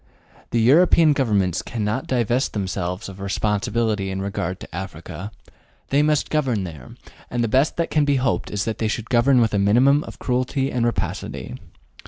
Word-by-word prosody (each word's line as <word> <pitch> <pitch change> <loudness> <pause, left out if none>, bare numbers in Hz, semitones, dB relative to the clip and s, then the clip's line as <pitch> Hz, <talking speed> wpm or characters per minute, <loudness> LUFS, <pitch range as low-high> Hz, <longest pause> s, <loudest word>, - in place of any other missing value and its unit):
The 120 - 0
European 155 +5 +5
governments 100 - +1
cannot 110 +2 -3
divest 120 0 0
themselves 95 -1 -3
of 100 -1 -10
responsibility 105 +1 -1
in 95 0 -3
regard 95 -2 -3
to - - -10
Africa. 85 +1 -7 0.6
They 140 +2 +3
must 150 -1 +1
govern 130 -10 0
there, 80 -8 -9 0.3
and 120 -1 -1
the - - +1
best 130 +7 +2
that 170 -1 -1
can 150 - +3
be 145 -1 +2
hoped 130 -2 0
is 100 -1 -2
that 115 -1 -3
they 110 - 0
should 110 +1 -4
govern 125 +2 +4
with 115 -3 +2
a 100 - +2
minimum 125 +9 +4
of - - -10
cruelty 130 +2 -1
and 120 -1 +1
rapacity. 95 -4 -4
115 Hz, 175 wpm, -22 LUFS, 100-130 Hz, 0.6 s, European